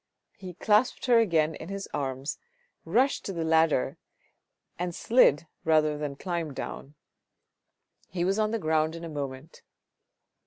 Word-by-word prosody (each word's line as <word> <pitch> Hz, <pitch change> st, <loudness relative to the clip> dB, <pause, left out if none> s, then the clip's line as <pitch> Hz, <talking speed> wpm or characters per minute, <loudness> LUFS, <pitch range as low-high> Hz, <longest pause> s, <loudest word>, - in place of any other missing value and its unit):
He 185 Hz, -3 st, -9 dB
clasped 215 Hz, +6 st, +2 dB
her 240 Hz, -2 st, +5 dB
again 160 Hz, -7 st, +2 dB
in 160 Hz, -, -9 dB
his 195 Hz, 0 st, -5 dB
arms, 135 Hz, 0 st, -3 dB, 0.5 s
rushed 245 Hz, +12 st, +2 dB
on -, -, -34 dB
to -, -, -4 dB
the 160 Hz, -, -1 dB
ladder, 160 Hz, -4 st, +2 dB, 0.8 s
and 175 Hz, -1 st, -3 dB
slid, 170 Hz, -, +4 dB, 0.2 s
rather 155 Hz, -1 st, +3 dB
than 145 Hz, -1 st, -4 dB
climbed 170 Hz, -3 st, -4 dB
down; 140 Hz, +2 st, -7 dB, 1.1 s
he 175 Hz, 0 st, -2 dB
was 195 Hz, +3 st, +1 dB
on 215 Hz, 0 st, +2 dB
the 230 Hz, -, -1 dB
ground 155 Hz, -3 st, +1 dB
in 165 Hz, -, -8 dB
a 165 Hz, -, -5 dB
moment. 140 Hz, 0 st, -6 dB
165 Hz, 150 wpm, -28 LUFS, 150-195 Hz, 1.1 s, her